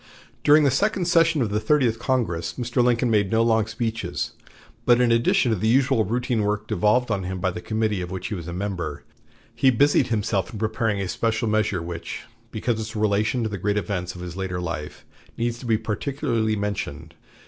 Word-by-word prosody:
During 150 +1 +6
the 140 - +4
second 195 - +1
session 165 -4 +3
of 105 - -2
the 105 - +1
Thirtieth 115 -1 +2
Congress 90 -10 -1
Mr. 120 +1 0
Lincoln 120 0 +2
made 100 -3 +2
no 115 0 +3
long 110 -2 +2
speeches, 110 -5 -3 0.5
but 120 -1 +4
in 125 -1 +3
addition 115 +1 +3
to - - +2
the 110 +3 -1
usual 125 -1 +3
routine 120 +2 0
work 105 +1 -1
devolved 110 +6 +2
on 100 -3 0
him 95 0 -4
by 95 +1 0
the 90 - -6
committee 110 -2 -1
of 90 - -5
which 95 -1 -5
he - - -3
was 85 -4 -5
a - - -4
member, 90 -5 -4 0.5
he 135 - +3
busied 140 +4 +3
himself 105 -4 -1
in 110 - -7
preparing 110 -1 -1
a 95 - -2
special 115 +3 -1
measure 105 -5 +1
which, 85 0 -6 0.3
because 115 +1 -1
of - - -5
its 110 0 -5
relation 110 +3 +1
to 110 - -1
the 100 -2 -5
great 105 +3 0
events 90 -2 -3
of 90 - -8
his 90 -1 -6
later 95 -1 -3
life, 80 -4 -5 0.3
needs 120 0 -1
to 125 - -8
be 110 -1 +3
particularly 115 0 -1
mentioned. 100 -6 -4
110 Hz, 205 wpm, -24 LUFS, 95-120 Hz, 0.5 s, During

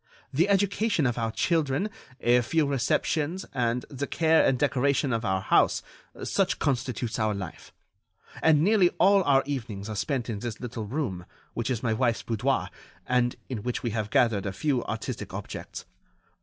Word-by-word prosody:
The 170 +9 +2
education 200 -3 +2
of 120 -1 0
our 115 -1 -1
children, 160 - +1 0.3
a 120 +1 +4
few 155 +6 +1
receptions, 145 +5 0
and 125 -1 0
the 140 0 -4
care 160 -1 +3
and 130 - +3
decoration 140 0 +1
of 115 0 -1
our 95 -4 0
house—such - - 0
constitutes 125 -4 -1
our 110 -1 +1
life; 95 -4 -8 0.7
and 155 -2 +5
nearly 195 -2 +5
all 195 +1 +5
our 135 -1 +4
evenings 115 -7 -4
are 110 - -4
spent 115 +4 -1
in 110 -4 -3
this 115 0 -5
little 120 -3 -5
room, 105 - -3 0.3
which 120 +1 -2
is 125 -3 -2
my 115 -3 +1
wife's 120 0 +1
boudoir, 120 +4 0 0.4
and 125 -1 +1
in 120 -5 -4
which 125 +2 -3
we 120 - -1
have 110 -1 -2
gathered 110 -5 +2
a 95 - -3
few 135 +2 0
artistic 110 0 -5
objects. - - -7
125 Hz, 165 wpm, -27 LUFS, 115-145 Hz, 0.7 s, and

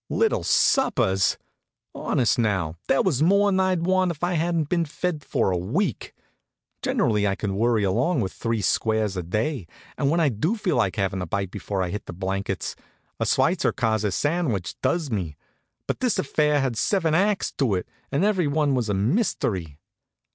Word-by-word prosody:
Little 450 - +1
suppers! 100 - +2 0.6
Honest, 125 +1 +1
now, 95 -8 0
there 135 - +3
was 150 -8 +1
more'n 200 +3 +4
I'd 185 -3 +1
want 185 0 +2
if 170 -1 -6
I 175 +1 +1
hadn't 165 -2 0
been 170 +1 +1
fed 160 0 -3
for 95 - 0
a 90 - 0
week. 90 - -2 0.7
Generally 105 -3 +1
I 100 - 0
can 100 -2 -3
worry 115 0 +2
along 120 - +1
with 95 -3 -3
three 115 -3 -2
squares 110 -3 +1
a 90 - -2
day, 105 - -2 0.3
and 140 - +2
when 165 +3 +2
I 160 -3 +3
do 145 - -1
feel 190 - -1
like 100 -6 +1
havin' 95 -2 -1
a 90 - -4
bite 95 +2 -2
before 100 -1 -3
I 90 - -3
hit 105 - -5
the - - -6
blankets, 95 +1 -3 0.4
a - - 0
sweitzerkase 110 -3 +1
sandwich 145 - -1
does 165 -6 0
me. 85 -8 -3 0.5
But - - -3
this 250 -4 +1
affair 150 0 +1
had 130 -4 -1
seven 165 - +1
acts 200 +4 +1
to 125 -8 +2
it, 90 - -3 0.2
and 145 +6 +1
everyone 155 -8 +1
was 120 -4 0
a 100 - +1
mystery. 100 - -1
120 Hz, 175 wpm, -24 LUFS, -, 0.7 s, more'n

